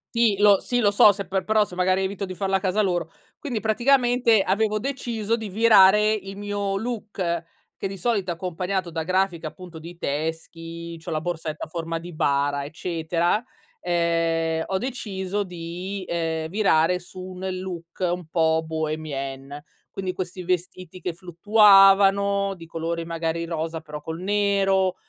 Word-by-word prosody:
Sì, 230 Hz, -4 st, +3 dB
lo 205 Hz, -2 st, +6 dB
sì, 245 Hz, -, -1 dB
lo 210 Hz, -4 st, +4 dB
so 205 Hz, +1 st, +7 dB
se 200 Hz, -2 st, -6 dB
per 190 Hz, +1 st, -1 dB
però 215 Hz, 0 st, +3 dB
se, 180 Hz, -, -11 dB
magari, 185 Hz, +1 st, +2 dB
evito 195 Hz, +1 st, -2 dB
di 185 Hz, -, -6 dB
farlo 195 Hz, +1 st, -1 dB
a -, -, +3 dB
casa 190 Hz, +2 st, +1 dB
loro. 175 Hz, -5 st, -1 dB, 0.3 s
Quindi, 245 Hz, -7 st, -3 dB
praticamente, 240 Hz, 0 st, +3 dB
avevo 215 Hz, +2 st, +1 dB
deciso 230 Hz, -4 st, -2 dB
di 220 Hz, -2 st, -6 dB
virare 210 Hz, 0 st, +6 dB
il 195 Hz, -2 st, -5 dB
mio 205 Hz, -1 st, -2 dB
look 200 Hz, -7 st, -3 dB, 0.3 s
che -, -, -3 dB
di 195 Hz, -, -7 dB
solito 195 Hz, -1 st, -1 dB
è -, -, -1 dB
accompagnato 180 Hz, +1 st, -3 dB
da 165 Hz, -1 st, -3 dB
grafiche, 185 Hz, -1 st, 0 dB
appunto, 175 Hz, +2 st, -9 dB
di 170 Hz, +2 st, -10 dB
teschi, 165 Hz, +2 st, -4 dB
c'ho 165 Hz, -, -8 dB
la 155 Hz, -1 st, -1 dB
borsetta 160 Hz, -2 st, -4 dB
a -, -, -16 dB
forma 165 Hz, 0 st, -4 dB
di 175 Hz, +1 st, -9 dB
bara, 140 Hz, -2 st, 0 dB
eccetera, 170 Hz, +4 st, -1 dB, 0.4 s
ehm, 165 Hz, -2 st, 0 dB
ho 190 Hz, -, -1 dB
deciso 205 Hz, -5 st, -3 dB
di, 180 Hz, +2 st, -6 dB
ehm, 160 Hz, -2 st, -2 dB
virare 180 Hz, -3 st, +3 dB
su 185 Hz, +1 st, -11 dB
un 185 Hz, 0 st, -6 dB
look 180 Hz, -2 st, -7 dB
un 180 Hz, -1 st, -1 dB
po' 160 Hz, -1 st, +2 dB
bohémien. 145 Hz, -3 st, -4 dB, 0.3 s
Quindi 190 Hz, -1 st, -3 dB
questi 185 Hz, 0 st, -5 dB
vestiti 180 Hz, 0 st, -3 dB
che 175 Hz, 0 st, -3 dB
fluttuavano 195 Hz, +2 st, +5 dB
di 165 Hz, -2 st, -11 dB
colore 165 Hz, 0 st, -4 dB
magari 165 Hz, 0 st, -2 dB
rosa 165 Hz, -1 st, -4 dB
però 150 Hz, 0 st, -8 dB
col 160 Hz, +1 st, -6 dB
nero, 195 Hz, -1 st, +2 dB
185 Hz, 160 wpm, -24 LUFS, 165-200 Hz, 0.4 s, so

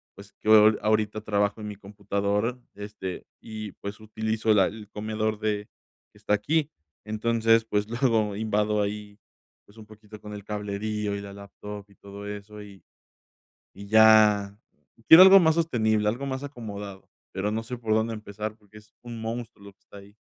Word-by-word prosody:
pues, 100 Hz, 0 st, -14 dB
que -, -, -10 dB
ho 110 Hz, 0 st, +7 dB
ahorita 110 Hz, 0 st, +1 dB
trabajo 105 Hz, 0 st, -1 dB
en 105 Hz, -, -6 dB
mi 105 Hz, -, -6 dB
computadora, 100 Hz, +3 st, -2 dB, 0.2 s
este, 100 Hz, -2 st, -7 dB, 0.2 s
y 110 Hz, -3 st, -8 dB
pues, 100 Hz, +1 st, -8 dB
utilizo 110 Hz, 0 st, -1 dB
la 95 Hz, -3 st, +4 dB
el 105 Hz, -1 st, -9 dB
comedor 110 Hz, 0 st, -2 dB
de 105 Hz, -1 st, -2 dB, 0.5 s
que -, -, -20 dB
está -, -, -1 dB
aquí. 150 Hz, +9 st, 0 dB, 0.3 s
Entonces, 115 Hz, +1 st, +2 dB
pues, 105 Hz, -2 st, -1 dB
luego 115 Hz, -4 st, +1 dB
invado 105 Hz, -1 st, 0 dB
ahí, 105 Hz, 0 st, -5 dB, 0.5 s
pues, 105 Hz, -, -22 dB
un 110 Hz, -, -12 dB
poquito 105 Hz, 0 st, -14 dB
con 105 Hz, -, -10 dB
el 105 Hz, -1 st, -8 dB
cablerío 105 Hz, 0 st, -3 dB
y 100 Hz, -, -4 dB
la 100 Hz, 0 st, -9 dB
laptop 100 Hz, 0 st, -10 dB
y 100 Hz, -, -22 dB
todo 100 Hz, 0 st, -11 dB
eso, 105 Hz, +1 st, -8 dB
y 100 Hz, -2 st, -15 dB, 0.9 s
y 100 Hz, +1 st, -11 dB
ya 105 Hz, -2 st, +5 dB, 0.5 s
quiero 165 Hz, +3 st, +11 dB
algo 195 Hz, +1 st, +9 dB
más 160 Hz, -2 st, +3 dB
sostenible, 110 Hz, -10 st, +1 dB
algo 120 Hz, +6 st, -2 dB
más 130 Hz, 0 st, -4 dB
acomodado, 105 Hz, -7 st, -8 dB, 0.2 s
pero 100 Hz, +2 st, -2 dB
no 110 Hz, +1 st, -2 dB
sé 125 Hz, +2 st, -6 dB
por 110 Hz, -2 st, -2 dB
dónde 110 Hz, +1 st, 0 dB
empezar 105 Hz, 0 st, -7 dB
porque 105 Hz, 0 st, -17 dB
es 105 Hz, 0 st, -21 dB
un 120 Hz, -2 st, -8 dB
monstruo 115 Hz, -2 st, -6 dB
lo 100 Hz, -, -12 dB
que 100 Hz, -, -64 dB
está 100 Hz, -, -15 dB
ahí. 100 Hz, +1 st, -16 dB
105 Hz, 175 wpm, -26 LUFS, 100-110 Hz, 0.9 s, quiero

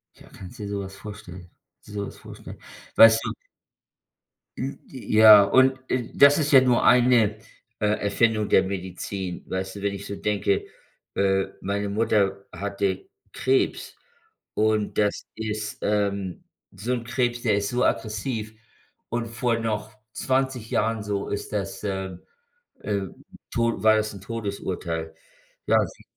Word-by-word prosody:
Ja, -, -, -17 dB
kannst 95 Hz, +7 st, -12 dB
du -, -, -5 dB
dir 100 Hz, -, -5 dB
sowas 100 Hz, -1 st, -5 dB
vorstellen 95 Hz, -4 st, -10 dB, 0.3 s
sowas 100 Hz, -1 st, -6 dB
vorstellen. -, -, -11 dB, 0.4 s
Weißt 115 Hz, 0 st, +9 dB
du -, -, -2 dB, 1.3 s
Hm, 135 Hz, +2 st, -4 dB
ja, 110 Hz, -5 st, +7 dB
und, 130 Hz, +6 st, +4 dB
äh, 125 Hz, -2 st, -1 dB
das 140 Hz, +1 st, +7 dB
ist 150 Hz, -2 st, 0 dB
ja 135 Hz, -2 st, +8 dB
nur 125 Hz, -2 st, +3 dB
eine, 120 Hz, -4 st, +4 dB, 0.4 s
äh, 105 Hz, -, 0 dB
Erfindung 105 Hz, +1 st, +1 dB
der -, -, +5 dB
Medizin, 95 Hz, -1 st, -5 dB
weißt 95 Hz, +1 st, -4 dB
du? -, -, -8 dB
Wenn 100 Hz, 0 st, -1 dB
ich 100 Hz, 0 st, -7 dB
so 100 Hz, -, -5 dB
denke, 100 Hz, -1 st, 0 dB, 0.5 s
äh, 95 Hz, -1 st, +2 dB, 0.2 s
meine 100 Hz, +1 st, -2 dB
Mutter 100 Hz, -2 st, +1 dB
hatte 100 Hz, 0 st, -2 dB, 0.2 s
Krebs 130 Hz, +1 st, 0 dB, 0.6 s
und 110 Hz, -1 st, 0 dB
das 105 Hz, -1 st, 0 dB
ist, 105 Hz, -1 st, -4 dB
ähm, 100 Hz, -3 st, -1 dB, 0.3 s
so 120 Hz, +5 st, -3 dB
'n 120 Hz, -2 st, -3 dB
Krebs, 120 Hz, 0 st, -1 dB
der 110 Hz, -4 st, +2 dB
ist 100 Hz, 0 st, -1 dB
so 125 Hz, 0 st, 0 dB
aggressiv 110 Hz, +2 st, -2 dB, 0.6 s
und 120 Hz, 0 st, -2 dB
vor 115 Hz, 0 st, -1 dB
noch 110 Hz, -1 st, -3 dB, 0.2 s
20 130 Hz, -3 st, -1 dB
Jahren, 115 Hz, -1 st, 0 dB
so, 100 Hz, -1 st, -3 dB
ist 100 Hz, -, -4 dB
das 100 Hz, -1 st, -4 dB
ähm, 95 Hz, -3 st, -4 dB, 0.6 s
äh, 100 Hz, -1 st, -1 dB, 0.5 s
Tod 115 Hz, -3 st, 0 dB
war 110 Hz, 0 st, +6 dB
das 110 Hz, 0 st, -1 dB
'n 100 Hz, -, -10 dB
Todesurteil. 95 Hz, -7 st, -4 dB, 0.5 s
Ja, -, -, +4 dB
sie -, -, -15 dB
105 Hz, 140 wpm, -25 LUFS, 100-115 Hz, 1.3 s, Weißt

